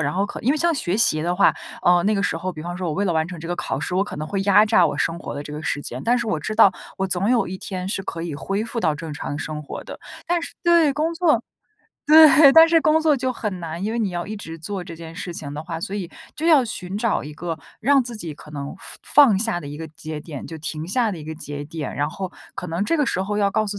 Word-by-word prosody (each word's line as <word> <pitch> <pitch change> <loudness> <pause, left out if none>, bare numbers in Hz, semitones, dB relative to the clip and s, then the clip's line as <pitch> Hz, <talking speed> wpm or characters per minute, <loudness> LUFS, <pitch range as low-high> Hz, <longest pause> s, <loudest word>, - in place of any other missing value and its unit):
然 145 -2 0
后 195 +4 +1
可 - - -6
因 260 +5 +3
为 - - 0
像 340 +2 +2
学 195 - -1
习 155 -9 +4
的 175 +1 0
话， 195 - +5 0.3
呃， 175 0 +5
那 215 - +2
个 195 - 0
时 165 - 0
候 185 +2 -4
比 155 - -8
方 175 +1 -5
说 185 - -3
我 150 - -2
为 200 - 0
了 180 - +1
完 160 -1 +1
成 170 -2 -8
这 165 - -7
个 175 - -2
考 135 - -3
试， 180 - -2
我 195 - +2
可 - - -8
能 155 +1 -5
会 195 +2 -1
压 205 +1 +6
榨 210 -5 +4
我 - - -3
生 170 +1 -1
活 - - -6
的 145 - -5
这 150 - -9
个 150 - -5
时 145 - -2
间， 125 -1 -5
但 240 +1 +3
是 235 -2 -2
我 160 - 0
知 215 +8 -4
道， 205 -4 +6 0.3
我 190 - 0
总 185 +2 +1
有 240 -5 +2
一 185 +1 -6
天 185 -1 -5
是 195 - -1
可 165 - -5
以 170 -2 -4
恢 195 +8 -2
复 230 +1 -5
到 160 -9 +1
正 160 0 -7
常 145 - -5
的 145 - -4
生 155 -1 -4
活 150 - -7
的。 - - -9 0.3
但 345 0 0
是 330 - -7
对， 340 -4 +4
工 310 +4 -1
作 330 -2 +2 0.7
对， 305 -2 +8
但 325 0 +8
是 330 0 +5
工 310 +1 +3
作 310 -3 +3
就 255 0 -1
很 210 -6 -4
难。 170 +1 -5
因 215 - -1
为 235 - -2
你 220 -4 0
要 175 +2 -4
一 215 - -5
直 165 -5 -8
做 190 +3 -5
这 170 -1 -9
件 165 0 -10
事 175 - -6
情 145 -4 -6
的 150 - -5
话， 165 -1 -5
所 195 - -4
以 195 -4 -3 0.3
就 315 - -3
要 310 -6 +6
寻 195 -5 -5
找 230 -1 0
一 150 +1 -8
个 165 +1 -4 0.2
让 275 +2 +4
自 240 -1 -7
己 175 -7 -6
可 150 - -14
能 140 -1 -6 0.3
放 290 -3 +6
放 195 -3 +2
下 220 -4 0
的 160 - -10
一 145 - -7
个 160 +1 -7
节 155 0 -7
点， 145 -5 -8
就 165 - -8
停 155 0 -5
下 225 +3 +1
的 185 - -5
一 155 - -9
个 160 +1 -6
节 145 -2 -6
点。 155 0 -6
然 145 - 0
后， 180 +3 -5 0.2
可 180 - -6
能 170 +4 -1
这 330 - +1
个 295 -4 +1
时 185 - 0
候 210 +1 -2
要 200 -1 +3
告 215 +2 0
诉 205 0 -4
185 Hz, 325 characters per minute, -22 LUFS, 160-230 Hz, 0.7 s, 对